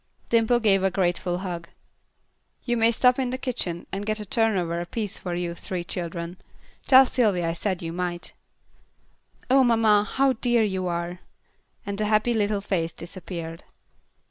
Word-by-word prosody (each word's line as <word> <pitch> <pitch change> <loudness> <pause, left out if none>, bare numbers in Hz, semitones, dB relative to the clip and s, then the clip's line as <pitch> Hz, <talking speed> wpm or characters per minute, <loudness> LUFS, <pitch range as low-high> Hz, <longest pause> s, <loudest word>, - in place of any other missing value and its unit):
Dimple 230 +1 +3
gave 200 -4 +3
her 195 - +3
a - - +1
grateful 175 -1 0
hug. 175 -2 -5 0.9
"You 240 - 0
may 230 0 +4
stop 250 +2 +3
in 255 -2 0
the 255 - -2
kitchen 225 -10 -3
and 195 +1 -3
get 215 +1 -2
a 210 - -6
turnover 195 -9 +1
apiece 205 +3 -4
for 175 -2 -4
you 175 -1 -2
three 175 +1 -4
children. 170 0 -5 0.5
Tell 265 0 +8
Sylvy 210 -9 +1
I 165 0 0
said 185 +1 -2
you 165 0 -4
might." 175 0 -4 1.2
"Oh, 265 0 +6
mamma, 225 -4 +4
how 270 0 +3
dear 240 -1 +2
you 190 -3 -1
are," 175 +1 -3 0.7
and 200 0 -4
the 215 - +1
happy 215 +3 +2
little 205 -2 0
face 170 -5 -1
disappeared. 170 -2 -7
195 Hz, 165 wpm, -25 LUFS, 175-225 Hz, 1.2 s, Tell